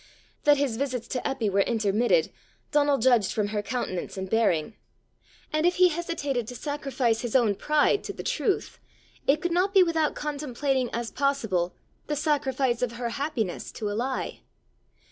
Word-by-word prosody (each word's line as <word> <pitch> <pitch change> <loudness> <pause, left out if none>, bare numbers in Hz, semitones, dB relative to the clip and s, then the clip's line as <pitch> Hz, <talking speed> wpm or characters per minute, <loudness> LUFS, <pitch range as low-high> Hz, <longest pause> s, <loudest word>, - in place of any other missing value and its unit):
That 290 -1 +6
his 275 -5 0
visits 255 -3 -2
to 255 - -1
Eppy 265 -4 -1
were 200 0 +1
intermitted, 225 - +2 0.4
Donal 290 -1 +3
judged 230 -5 +3
from 210 -2 -1
her 210 -1 -1
countenance 205 -5 -4
and 190 0 -3
bearing; 205 -4 +1 0.8
and 310 0 +1
if 355 +1 +3
he 365 0 +6
hesitated 300 -8 -2
to 245 - -7
sacrifice 265 -4 -1
his 240 -1 -4
own 235 -5 +4
pride 300 - +2
to - - -4
the - - -7
truth, 400 - -1 0.5
it 300 +5 +3
could 350 - 0
not 375 +4 +1
be 380 - +8
without 325 -3 +1
contemplating 280 -3 -1
as 235 0 -3
possible 225 -11 0 0.3
the 300 - -1
sacrifice 270 -5 0
of 245 -2 -1
her 235 0 -3
happiness 235 - -3
to 210 -2 -3
a - - -2
lie. 255 +5 -3
255 Hz, 165 wpm, -27 LUFS, 225-295 Hz, 0.8 s, be